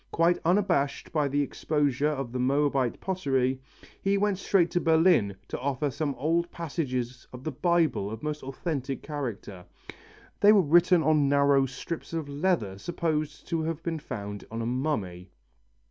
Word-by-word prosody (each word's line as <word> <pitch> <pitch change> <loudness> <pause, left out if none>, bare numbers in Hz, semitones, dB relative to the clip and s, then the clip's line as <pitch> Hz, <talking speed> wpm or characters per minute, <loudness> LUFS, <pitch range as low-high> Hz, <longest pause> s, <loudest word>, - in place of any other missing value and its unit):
Quite 170 +1 +3
unabashed 175 -6 +1
by 150 -3 +2
the 145 +1 +1
exposure 145 -1 0
of 135 -5 -3
the 125 - -3
Moabite 135 -1 +1
pottery, 135 -8 0 0.4
he 195 +1 +2
went 200 -1 +1
straight 180 -4 +2
to 175 - +1
Berlin 160 - +4
to - - -4
offer 140 +2 -1
some 145 +1 -2
old 165 +6 0
passages 130 -7 -4
of 125 0 -10
the 155 - -2
Bible 165 - +1
of 110 +4 -7
most 150 0 -3
authentic 135 0 -4
character. 115 -10 -5 0.8
They 205 +1 +7
were 205 - +6
written 175 +2 +4
on 150 -2 +3
narrow 140 -1 +4
strips 160 +7 -6
of 160 -3 -3
leather 140 - -1
supposed 155 +1 -3
to 165 -1 0
have 165 0 -3
been 165 -2 -2
found 105 -8 -6
on 115 - -5
a - - -3
mummy. 110 - -2
145 Hz, 160 wpm, -27 LUFS, 130-165 Hz, 0.8 s, They